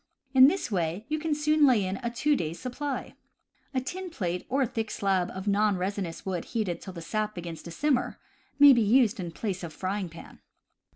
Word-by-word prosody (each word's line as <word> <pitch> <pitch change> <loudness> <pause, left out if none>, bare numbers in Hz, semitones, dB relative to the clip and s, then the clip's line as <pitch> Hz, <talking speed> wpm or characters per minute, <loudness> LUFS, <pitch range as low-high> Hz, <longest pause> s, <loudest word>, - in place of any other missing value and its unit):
In 260 0 +9
this 350 -5 -1
way 175 +2 -1
you 310 0 0
can 310 -1 -1
soon 300 0 +4
lay 230 -7 +4
in 185 +1 -2
a 240 -2 -3
two 290 +5 +1
days' 165 - -3
supply. 270 +2 -4 0.6
A 265 - 0
tin 365 +8 -5
plate, 180 - -3
or 270 +1 +2
a - - +2
thick 225 -2 -3
slab 190 -4 0
of 190 +2 -7
non 205 -1 +2
resinous 185 -2 -3
wood 185 -3 -2
heated 210 -7 -2
till 190 - -8
the 170 -2 -8
sap 215 +3 -2
begins 170 -2 -6
to - - -9
simmer, 265 - 0 0.4
may 285 -1 +9
be 240 - +3
used 225 0 +3
in 175 -2 -3
place 185 0 -4
of 170 - -5
frying 190 +2 -3
pan. 165 - -13
210 Hz, 210 wpm, -28 LUFS, 180-265 Hz, 0.6 s, In